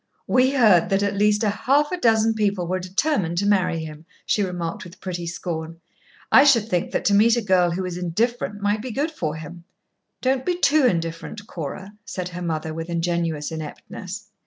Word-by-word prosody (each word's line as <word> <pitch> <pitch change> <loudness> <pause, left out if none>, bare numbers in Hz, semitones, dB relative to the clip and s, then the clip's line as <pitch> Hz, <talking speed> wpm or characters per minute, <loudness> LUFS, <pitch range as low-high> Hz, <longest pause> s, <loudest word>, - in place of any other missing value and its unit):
"We 260 +1 +3
heard 215 -10 +5
that 195 +1 +2
at 200 0 0
least 210 +1 +2
half 260 +8 +2
a 365 - -1
dozen 225 -4 +3
people 205 -4 0
were 185 +2 -1
determined 185 - -1
to 200 - +1
marry 185 -5 +1
him," 155 +1 -11 0.2
she 210 - +1
remarked 175 -3 -3
with 180 +1 -13
pretty 175 -2 -5
scorn. 165 -1 -5 0.5
"I 270 - +8
should 240 -7 +4
think 180 -6 -1
that - - -2
to 205 - +3
meet 225 +4 +5
a - - +1
girl 185 -3 +3
who 175 +2 -2
was 180 -1 -4
indifferent 205 +4 -1
might 205 +1 +1
be 255 - -6
good 285 +7 -1
for 155 - -3
him." 160 +2 -9 0.6
"Don't 260 0 0
be 355 +2 -1
too 300 -5 +4
indifferent, 165 +3 -3
Cora," 190 +3 -7
said 180 -2 -5
her 180 0 -7
mother, 160 -2 -3
with 165 +1 -6
ingenuous 170 -3 -1
ineptness. 180 +6 -7
190 Hz, 190 wpm, -23 LUFS, 170-220 Hz, 0.6 s, I